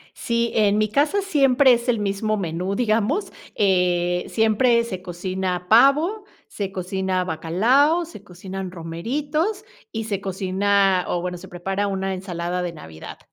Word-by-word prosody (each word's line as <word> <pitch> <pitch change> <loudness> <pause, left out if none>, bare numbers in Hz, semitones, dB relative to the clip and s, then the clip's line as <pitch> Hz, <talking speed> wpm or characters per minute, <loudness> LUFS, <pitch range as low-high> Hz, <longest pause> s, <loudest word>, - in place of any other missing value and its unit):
Sí, 235 0 -1
en 210 -1 +3
mi 215 - +2
casa 295 - +1
siempre 275 -7 +4
es 240 +1 0
el 240 -2 +2
mismo 205 +1 -1
menú, 180 0 -3
digamos, 230 - 0 0.2
eh, 180 -3 +1
siempre 235 +2 +3
se 185 -6 -6
cocina 185 0 -3
pavo, 300 - +4 0.2
se 195 -2 -5
cocina 185 0 -2
bacalao, 230 - +2
se 310 - -12
cocinan 190 0 -7
romeritos 285 - -3 0.3
y 225 - -3
se 205 -3 -3
cocina, 195 0 +1
o 175 - -1
bueno, 180 0 -4
se 190 +2 -12
prepara 190 +3 -3
una 195 -1 -2
ensalada 180 -1 -4
de 175 - -3
navidad. 80 - -11
195 Hz, 145 wpm, -22 LUFS, 180-235 Hz, 0.3 s, siempre